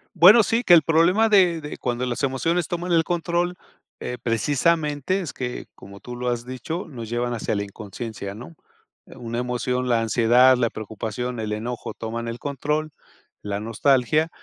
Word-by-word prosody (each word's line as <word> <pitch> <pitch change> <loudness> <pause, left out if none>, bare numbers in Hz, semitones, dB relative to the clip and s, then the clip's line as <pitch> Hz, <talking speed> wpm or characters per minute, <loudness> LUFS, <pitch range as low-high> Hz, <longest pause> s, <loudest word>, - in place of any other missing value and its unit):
Bueno, 210 +6 +8
sí, 230 +4 0
que 175 - +6
el 160 -3 +7
problema 170 +7 +4
de 180 -5 +4
de 150 - -7
cuando 125 0 -2
las 120 +2 -3
emociones 165 +6 0
toman 175 +1 -3
el 165 -1 +4
control, 175 +1 -1 0.4
eh, 125 - -5
precisamente 150 - 0
es 165 - -6
que, 125 -1 -5
como 100 +1 -13
tú 125 - -8
lo 125 0 -2
has 120 0 -2
dicho, 145 - -5
nos 120 -7 -8
llevan 120 +1 -1
hacia 110 -2 -2
la 100 - -1
inconsciencia, 100 0 -7
¿no? 125 +9 -11 0.5
Una 120 0 -6
emoción, 125 +1 -2
la 115 -1 +3
ansiedad, 120 +3 +5
la 120 -2 +1
preocupación, 110 +3 -5
el 110 -1 -3
enojo, 115 +3 -4
toman 115 +1 -5
el 115 +1 -5
control, 150 +2 -2 0.5
la 100 0 -3
nostalgia 135 +7 +2
125 Hz, 170 wpm, -23 LUFS, 115-165 Hz, 0.5 s, Bueno